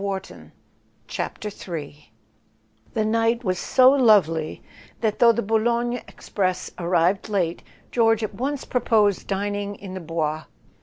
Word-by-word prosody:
A - - -5
SON 200 - -1
AT 190 - -5 1.2
THE 210 - -4
FRONT - - -12
III 145 -6 -7 0.8
HE 215 -1 +1
night 230 +2 +1
was 185 -4 -1
so 255 0 +5
lovely 200 - +3 0.4
that, 220 -3 0
though 235 -1 +7
the 235 +1 -1
Bou 220 +2 +2
X 215 - -1
logne 240 +1 -1
express 185 -2 -3
arrived 175 +3 +1
late, 180 -5 -1 0.3
George 225 -2 +3
at 215 - -3
once 275 +2 -3
pro¬ 250 -2 -1
posed 205 -5 +2
dining 205 +1 -2
in 195 -2 -9
the 190 - -5
Bois. 160 -2 -3
205 Hz, 160 wpm, -23 LUFS, 180-230 Hz, 1.2 s, though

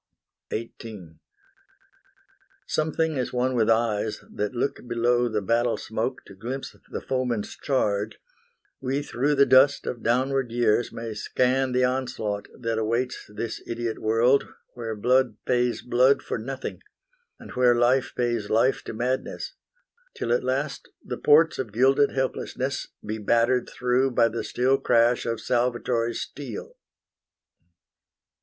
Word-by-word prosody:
XVIII 105 -7 -7 1.5
Something 155 -1 0
as 125 - -2
one 125 +1 0
with 115 -3 +2
eyes 110 -2 +1
that 105 +3 -2
look 125 +4 -1
below 120 +1 +2
The 105 -2 -1
battle 115 +1 +1
smoke 115 +5 -3
to 100 - -12
glimpse 120 +8 -6
the - - -4
foeman's 125 -5 -2
charge, 105 -6 -1 0.6
We 135 +2 -1
through 145 +2 0
the 140 0 +6
dust 135 +2 +5
of 120 - -4
downward 130 +1 +1
years 120 -1 +2
may 115 -1 -5
scan 130 +4 +1
The 125 0 +2
onslaught 120 -5 -1
that 115 -2 -1
awaits 115 +3 -2
this 110 +2 -4
idiot 115 -1 -3
world 115 +5 +3 0.3
Where 115 -2 -5
blood 125 +1 +2
pays 125 -1 +1
blood 130 +3 +3
for - - -3
nothing, 135 +4 -5 0.6
and - - -11
where 125 -1 +4
life 125 +2 +3
Pays 120 -4 -1
life 120 +5 +2
to - - -5
madness, 125 - -2 0.6
till 120 - -1
at 120 - +1
last 135 +3 -2 0.2
the 125 - -4
ports 155 +2 +5
Of 120 -5 -3
gilded 135 +5 +4
helplessness 130 0 -2 0.2
be 110 +1 -3
battered 120 +4 +2
through 125 +2 +1
By 115 -2 +3
the 115 +1 -4
still 130 +2 +1
crash 120 +1 +3
of 115 -1 -1
salvatory 120 -1 0
steel. 130 -6 -6
120 Hz, 135 wpm, -25 LUFS, 115-130 Hz, 1.5 s, the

